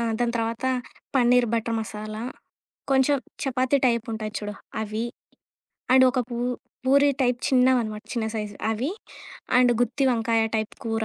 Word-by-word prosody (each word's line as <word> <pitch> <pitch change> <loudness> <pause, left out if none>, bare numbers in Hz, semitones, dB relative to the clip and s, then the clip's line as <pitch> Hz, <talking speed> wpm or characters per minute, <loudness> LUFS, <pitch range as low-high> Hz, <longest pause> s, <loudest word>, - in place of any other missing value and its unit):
ఆ! - - 0 0.2
దాని 240 -1 +1
తర్వాత, 230 +2 -2 0.5
పన్నీర్ 245 -1 +4
బటర్ 230 0 -1
మసాలా. 215 0 -5 0.7
కొంచెం 270 +2 +4 0.3
చపాతీ 260 +1 +1
టైప్ 235 -2 +1
ఉంటాయి 215 -1 -4
చూడు 210 -1 -5 0.3
అవి. 215 +2 -3 0.9
అండ్ 260 0 +7
ఒక 255 - 0
పూ 235 - -4 0.5
పూరీ 280 +2 +5
టైప్ 245 -1 +2
చిన్నవనమాట, 250 -5 +2
చిన్న 230 -2 -1
సైజు 210 -1 -4 0.2
అవి, 240 +7 -1 0.7
అండ్ 250 -1 +5
గుత్తి 270 +3 +1
వంకాయ 230 -1 +2
టైప్ 215 -1 -3
కూర. 225 -1 -1
235 Hz, 140 wpm, -25 LUFS, 220-255 Hz, 0.9 s, అండ్